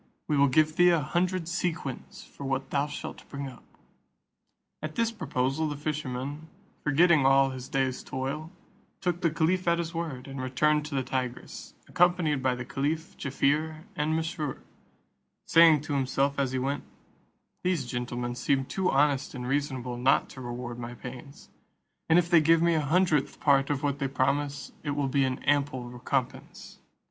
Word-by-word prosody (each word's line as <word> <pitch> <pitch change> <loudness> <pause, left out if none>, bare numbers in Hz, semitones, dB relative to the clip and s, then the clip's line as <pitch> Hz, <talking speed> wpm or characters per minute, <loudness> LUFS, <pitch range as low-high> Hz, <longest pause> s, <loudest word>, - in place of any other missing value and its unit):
We 150 - +1
will 140 0 +5
give 155 +4 +2
thee 175 0 +7
a 170 -2 +4
hundred 175 +3 -1
sequins 170 -6 -4
for - - -12
what 135 0 -2
thou 140 +1 +1
shalt 145 - -8
bring 140 -1 -5
up." 125 -3 -12 1.2
At 155 0 -5
this 230 -1 +1
proposal, 135 - -1
the 145 - -4
fisherman, 145 0 -4 0.4
forgetting 155 +1 +4
all 135 0 +5
his 130 0 -8
day's 130 -1 0
toil, 140 +5 -4 0.5
took 175 -2 -1
the 170 - +3
caliph 170 +4 0
at 170 0 +4
his 170 0 -3
word, 155 -7 -4
and 135 -1 -6
returned 150 +4 +2
to 145 - -5
the 135 - +1
Tigris, 125 -1 -5
accompanied 175 -5 +2
by 130 -1 +1
the 125 0 -6
caliph, 155 +6 -2
Jaaffier, 155 +3 0
and 155 -1 0
Mesrour; 160 -3 -2 0.9
saying 165 -3 +6
to 150 -1 -4
himself 140 +1 0
as 135 -2 +1
he 130 - -1
went, 135 +2 -2 0.8
"These 180 -7 0
gentlemen 120 0 -3
seem 135 +2 0
too 185 +6 -1
honest 140 0 +2
and 125 -1 -5
reasonable 130 -3 -2
not 125 +2 +3
to 130 - -10
reward 120 0 -6
my 120 0 -6
pains; 130 +3 -10 0.6
and 160 - +6
if 175 -1 +3
they 170 -2 +6
give 165 +2 +4
me 170 0 +4
the 160 - +2
hundredth 155 -1 +1
part 140 -2 +3
of 145 -1 -1
what 140 -1 0
they 135 - 0
promise, 140 +2 -1
it 145 -2 -3
will 140 -2 0
be 135 0 +2
an 130 -1 -3
ample 140 -4 0
recompence." 125 +1 -4
140 Hz, 170 wpm, -28 LUFS, 130-160 Hz, 1.2 s, thee